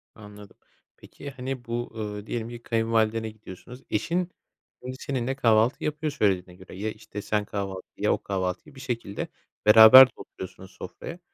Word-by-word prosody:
Anladım. 105 -1 -13 0.4
Peki, 140 - -10
hani 130 -1 -6
bu, 120 +1 -4
ııı, 105 -2 -5
diyelim 115 -1 -3
ki 120 0 -9
kayınvalidene 115 -1 0
gidiyorsunuz 110 +4 -12
eşin 175 - -1 0.5
önce 130 +1 -6
seninle 130 -1 -2
kahvaltı 115 -1 +3
yapıyor 150 0 -2
söylediğine 95 -8 0
göre. - - -12
Ya, 105 +3 -3
işte, 105 -1 -9
sen 105 0 -1
kahvaltıyı, 95 -2 -5
ya, - - +4
o - - -4
kahvaltıyı 95 +6 -3
bir - - -12
şekilde 115 -6 -4 0.4
beraber 110 +5 +10
de - - -19
oturuyorsunuz 95 0 -10
sofraya. 170 +2 -9
110 Hz, 155 wpm, -26 LUFS, 105-125 Hz, 0.5 s, beraber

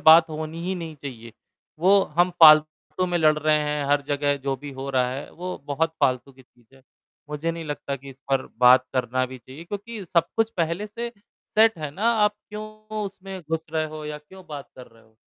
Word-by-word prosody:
बात 160 +1 +8
होनी 155 +2 -5
ही 190 - -1
नहीं 165 -3 -6
चाहिए। 115 -5 -8 0.5
वो 195 +3 +5 0.2
हम 175 +1 +5
फालतू 155 +3 +6
में 175 -1 0
लड़ 155 -2 +4
रहे 155 0 +3
हैं, 150 -1 -1
हर 145 0 +2
जगह 145 0 +1
जो 135 -1 -2
भी 145 +2 -8
हो 135 +1 -6
रहा 125 -2 +2
है, 135 +2 -6
वो 180 +2 -6
बहुत 160 +3 0
फालतू 130 +1 +1
की 130 0 -18
चीज़ 120 +1 -28
है। 135 - -20 0.5
मुझे 150 +3 -2
नहीं 165 0 -6
लगता 145 -2 -4
कि 140 +1 -13
इस 135 +1 -16
पर 135 -1 +1
बात 125 +1 +7
करना 130 0 0
भी 130 0 -9
चाहिए 130 +7 -12
क्योंकि 205 +3 -6
सब 170 -1 +1
कुछ 225 0 +2
पहले 170 +5 -1
से 235 +3 -5 0.5
सेट 225 -3 +5
है 150 -2 -4
ना 215 +10 +1
आप 210 -2 +3
क्यों 210 0 -6 0.4
उसमें 195 -1 -7
घुस 160 +1 -3
रहे 160 -1 +1
हो 155 0 -8
या 150 0 -5
क्यों 185 +5 -15
बात 145 -2 -7
कर 125 -1 -11
रहे 115 -1 -21
हो? 110 0 -27
155 Hz, 215 wpm, -24 LUFS, 135-175 Hz, 0.5 s, बात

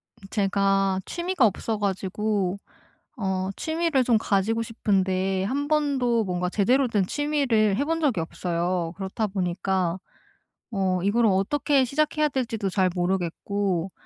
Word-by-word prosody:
음 195 - -14
제가 195 -1 +1
취미가 345 -5 +1
없어 220 +1 -1
가지고 200 0 -1 0.6
어 190 -3 -1
취미를 320 -4 +1
좀 235 -2 +3
가지고 215 +2 +1
싶은데 190 -4 0
한번도 275 -2 +1
뭔가 180 -1 -1
제대로 250 +8 +2
된 205 -5 +1
취미를 270 -9 +1
해 280 - 0
본 330 0 0
적이 265 - +1
없어요. 170 +1 -2
그렇다 195 +3 -2
보니까 185 -2 -1 0.7
어 190 -3 0
이거를 220 +3 +3
어떻게 265 +8 +2
시작해야 305 +3 +1
될지도 230 -7 -2
잘 185 -1 +2
모르겠고 185 +1 -1
200 Hz, 280 characters per minute, -25 LUFS, 190-250 Hz, 0.7 s, 좀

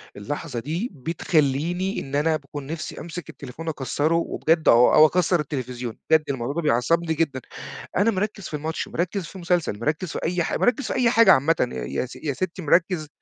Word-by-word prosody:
اللحظة 125 +5 -5
دي 165 - -3
بتخلّيني 165 +4 0
إن 135 +1 -5
أنا 155 +2 +2
باكون 145 -1 -7
نفسي 160 +2 -5
أمسِك 170 -1 -7
التليفون 140 +4 -9
أكسّره 150 +1 0
وبجد 165 -1 +1
أو 120 +1 +6
أو 155 - +9
أكسّر 175 +1 +2
التلفزيون. 125 -5 -4
بجد 160 -1 +5
الموضوع 135 0 -2
ده 170 - 0
بيعصّبني 160 +5 +1
جدًا. 145 -5 -1 0.6
أنا 205 +4 +4
مركّز 200 -1 -3
في - - -11
الماتش، 155 +2 -3
مركّز 175 +2 -2
في 165 - -12
المسلسل، 175 - -1
مركّز 150 +7 -2
في - - -3
أي 175 +1 0
حاج - - -2
مركّز 245 +2 +2
في - - -2
أي 250 -2 +3
حاجة 230 -4 +6
عامةً 155 +4 +3 0.3
يا - - -2
س 130 - -11
يا 145 -3 -3
ستّي 185 +5 -4
مركّز 165 0 +2
160 Hz, 185 wpm, -24 LUFS, 140-175 Hz, 0.6 s, أو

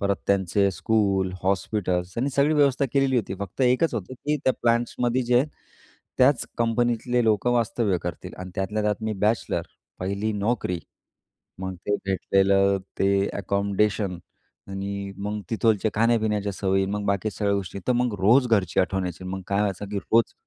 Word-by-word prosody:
परत 100 -1 +1
त्यांचे 100 0 +2
school, 95 -1 +1
hospitals 95 -1 -1
आणि 135 +3 0
सगळी 145 +3 +3
व्यवस्था 140 -2 +3
केलेली 135 -2 +2
होती. 100 -4 -1
फक्त 100 +5 -6
एकच 125 +6 +3
होतं 110 +4 -4
की 150 +4 -1
त्या 130 - +4
प्लांट्समध्ये 120 +1 +1
जे 125 +2 +3 0.7
त्याच 130 -1 +4
कंपनीतले 120 +1 +1
लोकं 110 +3 +2
वास्तव्य 115 -4 +1
करतील 85 -1 -6
आणि 90 0 -7
त्यातल्या 105 +3 -1
त्यात 105 +1 -1
मी 110 0 -1
बॅचलर, 110 +3 +1 0.4
पहिली 100 +4 -2
नोकरी. 105 -4 -1 0.8
मग 95 0 -4
ते 105 - +2
भेटलेलं 95 +1 +3 0.2
ते 95 - +3 0.3
अकोमोडेशन. 100 -1 0 0.5
आणि 100 0 -4
मग 105 +1 -3
तिथोलचे 110 -1 +2
खाण्या-पिण्याच्या 110 -3 +1
सवयी, 95 0 +1
मग 105 +1 -3
बाकी 100 +2 0
सगळ्या 100 -1 0
गोष्टी, 100 -1 -4
तर 125 - +3
मग 120 -3 0
रोज 120 +7 +5
घरची 100 -7 +2
आठवण 95 0 0
यायची, 90 +1 -6
मग 95 +1 -4
काय 100 0 0
व्हायचं 100 -1 -1
की 105 - -1
रोज 115 +4 +2
105 Hz, 155 wpm, -25 LUFS, 95-115 Hz, 0.8 s, रोज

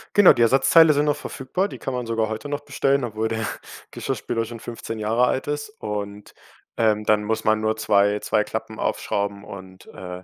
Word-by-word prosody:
Genau, 205 -2 +8
die 120 - -1
Ersatzteile 135 +7 +6
sind 145 +1 +1
noch 145 -1 +2
verfügbar, 150 +7 -3
die - - -8
kann 135 - -4
man 125 -1 -3
sogar 115 -1 0
heute 110 +5 -5
noch 145 0 -2
bestellen, 140 -1 +1
obwohl 110 -1 -2
der 110 -1 -2 0.4
Geschirrspüler 115 -1 -3
schon 115 0 -8
15 115 -1 -7
Jahre 115 +4 +2
alt 130 +3 -1
ist. 145 +6 -3
Und, 105 -1 -5 0.4
ähm, 105 -2 +1
dann 105 0 +3
muss 110 +1 -2
man 110 0 +3
nur 110 0 0
2 105 -1 +2
2 105 - +1
Klappen 110 0 -6
aufschrauben 100 0 -2
und, 95 -1 -11
äh, 90 0 -9
110 Hz, 195 wpm, -23 LUFS, 105-130 Hz, 0.4 s, Genau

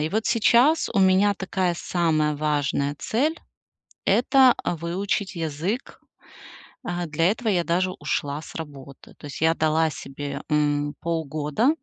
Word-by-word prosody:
и 155 - 0
вот 220 +4 -1
сейчас 240 +7 +4
у 200 - +1
меня 190 +2 +4
такая 185 -2 -1
самая 155 -4 +1
важная 145 -1 -1
цель- 300 +8 0 0.7
это 260 +1 +5
выучить 185 +4 -2
язык. 165 - -3 0.8
А 175 0 -3
для 165 +5 +2
этого 230 +1 -5
я 175 -4 +2
даже 185 +2 0
ушла 145 0 -2
с - - -12
работы. 140 -4 -10
То - - -12
есть 140 - -8
я 160 0 +4
дала 160 0 +1
себе, 140 0 -6
м, 145 -1 +1
полгода. 160 - 0
165 Hz, 135 wpm, -24 LUFS, 150-200 Hz, 0.8 s, это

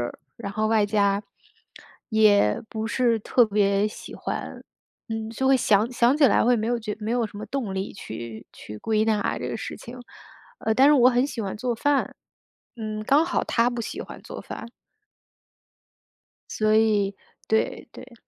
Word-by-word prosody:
儿。 120 - -4 0.2
然 200 -4 -6
后 215 +1 0
外 220 -1 +3
加 205 -1 +1 0.9
也 210 - +4
不 220 -1 -4
是 235 -1 +2
特 240 +3 +3
别 200 -1 +2
喜 210 - -8
欢， - - -5 0.4
嗯， 220 0 -4
就 265 +4 -2
会 265 0 +6
想 215 -1 +2
想 245 +3 +3
起 300 - +4
来 - - +4
会 245 +1 +4
没 215 -1 -2
有 240 +1 +1
觉 215 -2 -4
没 220 +2 -3
有 240 -2 +1
什 205 - -11
么 215 - -6
动 230 -4 -3
力 190 +1 -3
去 115 - -8
去 105 - -10
归 215 - +1
纳 215 -2 0
这 - - -4
个 - - -3
事 - - -6
情。 240 +2 -10 0.6
呃， 220 - 0
但 270 +4 +6
是 - - +6
我 250 -4 +6
很 245 +2 +2
喜 240 -5 -5
欢 195 -1 -4
做 240 +2 -2
饭， 285 +4 0 0.6
嗯， 215 -2 -4
刚 285 +7 +4
好 345 - -1
她 235 +1 +2
不 240 -1 -4
喜 225 - -5
欢 - - -9
做 - - -8
饭。 - - -8 1.8
所 215 0 +1
以 210 -3 +2 0.3
对， 220 0 0
对。 255 - -12
220 Hz, 195 characters per minute, -25 LUFS, 205-245 Hz, 1.8 s, 会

